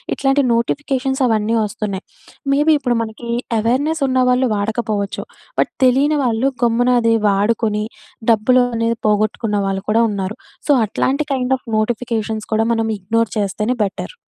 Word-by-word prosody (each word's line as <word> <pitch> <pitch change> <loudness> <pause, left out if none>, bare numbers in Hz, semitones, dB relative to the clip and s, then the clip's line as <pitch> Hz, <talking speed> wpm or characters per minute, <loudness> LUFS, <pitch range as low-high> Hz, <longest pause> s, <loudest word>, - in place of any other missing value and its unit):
ఇట్లాంటి 270 +1 +2
నోటిఫికేషన్స్ 265 +2 -1
అవన్నీ 220 0 +1
వస్తున్నాయి. 210 -2 -4 0.5
మేబీ 295 +3 +4
ఇప్పుడు 245 -4 0
మనకి 225 +1 -6 0.3
యవేర్నెస్ 275 +8 0
ఉన్నవాళ్ళు 255 -1 +2
వాడకపోవచ్చు. 210 -1 -2 0.4
బట్ - - +2
తెలియని 285 +4 +3
వాళ్ళు 240 +2 +1
గమ్మున 240 +1 +3
అది 230 0 +3
వాడుకొని 210 +1 +1 0.5
డబ్బులు 250 +3 +4
అనేది 230 0 0
పోగొట్టుకున్నవాళ్ళు 205 -2 0
కూడా 225 +2 +4
ఉన్నారు. 195 +1 -4 0.3
సో, 295 - +4
అట్లాంటి 270 +7 -1
కైండ్ 260 0 +1
ఆఫ్ 255 - -31
నోటిఫికేషన్స్ 220 -1 -2
కూడా 220 +1 +2
మనం 225 0 0
ఇగ్నోర్ 230 +4 0
చేస్తేనే 210 +4 -1
బెటర్. 200 - -5
230 Hz, 130 wpm, -18 LUFS, 215-255 Hz, 0.5 s, మేబీ